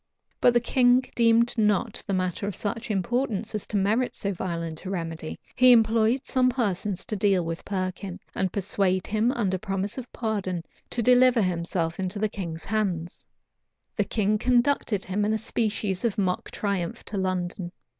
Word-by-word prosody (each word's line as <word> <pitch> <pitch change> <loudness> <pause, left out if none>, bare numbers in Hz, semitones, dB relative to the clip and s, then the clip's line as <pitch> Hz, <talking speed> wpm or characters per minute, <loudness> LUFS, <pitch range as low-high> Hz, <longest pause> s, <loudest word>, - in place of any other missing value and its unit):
But 245 - +4
the - - +6
king 245 +1 +4
deemed 235 0 +3
not 210 0 +1
the 200 - -1
matter 185 +2 -1
of 205 - -3
such 225 +3 -3
importance 220 +1 -1
as 215 - -3
to 210 - -1
merit 215 +6 +1
so 200 0 -2
violent 170 -3 -4
a 190 - -5
remedy, 165 -4 -4 0.2
He 255 0 +7
employed 225 +2 +4
some 255 -1 +2
persons 210 -6 -1
to 215 - -3
deal 195 -3 +2
with 165 +1 -4
Perkin, 185 -1 -4
and 190 -2 0
persuade 190 -2 0
him, 220 +3 +1
under 195 -8 0
promise 195 +3 -3
of 245 - -9
pardon, 195 -7 -2 0.3
to 235 - -2
deliver 250 -1 +5
himself 170 -1 -1
into 190 +2 -2
the 215 +1 0
king's 170 -5 -6
hands.[*] 185 -6 -2 0.7
The - - +2
king 210 -1 0
conducted 245 -4 +2
him 195 +2 -1
in 215 +1 +1
a - - +2
species 215 -4 -1
of 230 -4 0
mock 185 -3 -1
triumph 195 -5 -3
to 205 - -4
London. 180 -1 -2
205 Hz, 170 wpm, -26 LUFS, 185-230 Hz, 0.7 s, He